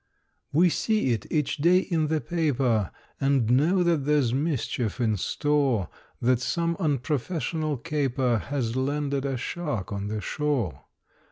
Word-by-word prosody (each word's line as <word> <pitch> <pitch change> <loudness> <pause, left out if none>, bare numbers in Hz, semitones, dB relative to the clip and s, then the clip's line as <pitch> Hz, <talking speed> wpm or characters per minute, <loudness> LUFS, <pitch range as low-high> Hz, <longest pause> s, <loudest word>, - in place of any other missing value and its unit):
We 175 +5 +5
see 215 - +1
it 110 -4 -2
each 150 -2 0
day 170 +5 +4
in 165 -4 0
the 155 0 +1
paper, 130 - 0 0.3
And 135 -4 +2
know 165 +9 +3
that 170 -1 +3
there's 145 -5 +2
mischief 130 - -1
in 110 -3 +2
store; 135 - 0 0.3
That 125 0 +2
some 170 +5 0
unprofessional 155 0 -1
caper 130 -5 0
Has 125 -4 -3
landed 140 +1 -1
a 135 -2 -1
shark 135 - -3
on 100 0 -3
the 105 +1 -3
shore. 140 - -2
140 Hz, 140 wpm, -26 LUFS, 120-155 Hz, 0.3 s, We